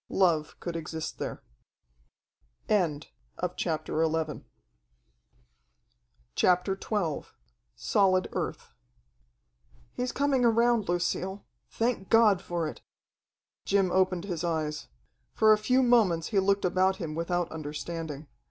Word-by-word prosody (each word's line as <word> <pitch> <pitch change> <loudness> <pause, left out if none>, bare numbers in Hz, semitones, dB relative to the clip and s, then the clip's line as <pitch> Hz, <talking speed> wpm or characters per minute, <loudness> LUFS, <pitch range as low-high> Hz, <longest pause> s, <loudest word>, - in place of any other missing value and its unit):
Love 165 -5 +1
could 170 -1 -5
exist 160 -1 -5
there. - - -5 2.1
CHAPTER 160 -1 -2 2.8
XII 175 -9 -1 0.5
Solid 185 -2 +2
Earth - - -4 1.2
"He's 250 0 -2
coming 275 -2 +1
around, 235 -3 +3
Lucille. 185 +3 -1 0.2
Thank 225 -4 -1
God 220 -5 +5
for 175 -4 -2
it!" - - -8 0.8
Jim 195 -2 +2
opened 185 -2 +2
his 175 -4 -4
eyes. 155 -3 -2 0.5
For 220 -1 +6
a - - +3
few 255 +5 +3
moments 210 -10 +3
he 205 - +2
looked 195 +1 +2
about 185 +1 +2
him 165 -6 -5
without 170 +2 -1
understanding. 155 0 -5
185 Hz, 95 wpm, -28 LUFS, 165-215 Hz, 2.8 s, For